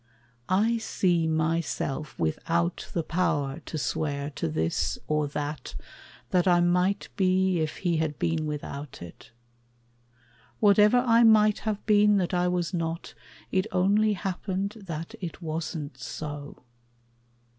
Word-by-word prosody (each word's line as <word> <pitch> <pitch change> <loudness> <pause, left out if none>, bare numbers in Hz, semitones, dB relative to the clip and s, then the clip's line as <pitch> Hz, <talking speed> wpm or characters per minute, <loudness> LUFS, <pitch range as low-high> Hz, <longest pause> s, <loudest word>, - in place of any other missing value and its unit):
I 220 +5 +2
see 175 -6 +1
myself 155 -2 -1
Without 85 +1 -1
the 170 - -1
power 150 -4 -1
to 160 - -4
swear 145 -1 -2
to 140 - -3
this 80 +1 -1
or 150 +1 +1
that 145 +1 -5 0.6
That 180 0 +3
I 175 -1 +5
might 180 +3 +1
be 185 -1 +2
if 155 -1 -2
he 175 -3 0
had 155 -2 -1
been 160 -2 -1
without 145 -6 -6
it. 85 - -12 1.3
Whatever 210 +2 +5
I 230 0 +5
might 215 -2 +5
have 210 -1 -3
been 210 -1 +5
that 185 -1 -1
I 180 0 +2
was 180 0 -1
not, 165 -1 -3 0.4
It 190 0 +1
only 205 +4 +3
happened 190 +1 -3 0.2
that 165 -1 -5
it 175 -3 -5
wasn't 160 -4 -5
so. 145 +1 -7
170 Hz, 130 wpm, -27 LUFS, 150-190 Hz, 1.3 s, I